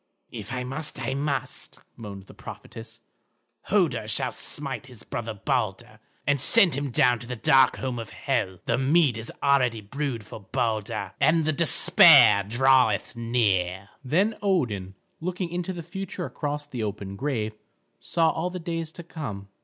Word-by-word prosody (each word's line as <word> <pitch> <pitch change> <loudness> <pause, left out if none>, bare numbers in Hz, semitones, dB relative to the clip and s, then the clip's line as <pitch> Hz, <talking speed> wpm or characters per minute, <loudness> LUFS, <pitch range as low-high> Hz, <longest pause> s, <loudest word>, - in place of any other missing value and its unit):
"If 110 -2 -8
I 125 -1 -3
must, 135 +5 -1
I 130 - -2
must," 140 0 -2 0.2
moaned 100 -4 -9
the - - -15
prophetess. 115 0 -11 0.6
"Hoder - - +1
shall - - -1
smite 130 -4 -4
his 125 -5 -13
brother 115 -2 -5
Balder 100 - -2 0.3
and 145 -2 +2
send 195 +1 +6
him 140 +1 -2
down 125 -2 +3
to 120 - -10
the 125 - -4
dark 130 +3 +4
home 130 -2 -3
of 115 - -7
Hel. 110 -9 -2
The - - 0
mead 140 -1 +3
is 115 0 -5
already 130 -5 +3
brewed 125 +2 -4
for 110 - -9
Balder, 110 -3 -2
and 160 0 +3
the 155 - +1
despair 145 -9 +6
draweth 125 +2 +2
near." 100 -5 0
Then 190 - +1
Odin, 115 - -1 0.2
looking 180 +1 -3
into 180 +1 -3
the 175 -2 -6
future 185 +1 -6
across 145 -1 -4
the 130 -5 -6
open 100 -2 -5
grave, 115 -3 -2 0.5
saw 165 -1 +1
all 165 +2 -2
the 180 - -6
days 165 -2 -4
to 175 - -8
come. 110 - -7
130 Hz, 160 wpm, -25 LUFS, 110-155 Hz, 0.6 s, send